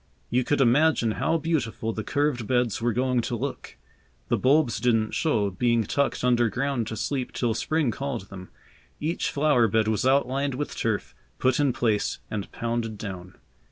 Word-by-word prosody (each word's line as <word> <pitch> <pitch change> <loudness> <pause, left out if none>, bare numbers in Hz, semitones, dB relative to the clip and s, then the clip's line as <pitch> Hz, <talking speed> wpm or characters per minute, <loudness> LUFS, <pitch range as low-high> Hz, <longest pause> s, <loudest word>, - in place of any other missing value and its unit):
You 125 +1 +2
could 145 +2 +1
imagine 135 -1 +3
how 160 +9 0
beautiful 135 -8 -2
the 110 - -4
curved 145 -5 0
beds 120 -2 +1
were 120 +1 +1
going 125 +1 +1
to - - -3
look. - - -5 0.5
The - - +2
bulbs 135 -4 +3
didn't 115 -2 +2
show, 110 - +1
being 115 +4 +1
tucked 140 +5 -1
underground 120 0 +1
to 110 - -5
sleep 130 +3 -2
till 120 -3 0
Spring 155 +2 0
called 120 -5 -4
them. 95 -2 -10 0.5
Each 160 +4 -1
flower 145 -5 +3
bed 110 +1 +1
was 110 -1 0
outlined 135 +1 +1
with 145 +2 -4
turf, - - -2 0.2
put 130 +1 +2
in 145 -2 +3
place 110 -4 0
and 105 -2 -4
pounded 115 -2 -3
down. 95 -3 -7
120 Hz, 165 wpm, -26 LUFS, 110-140 Hz, 0.5 s, imagine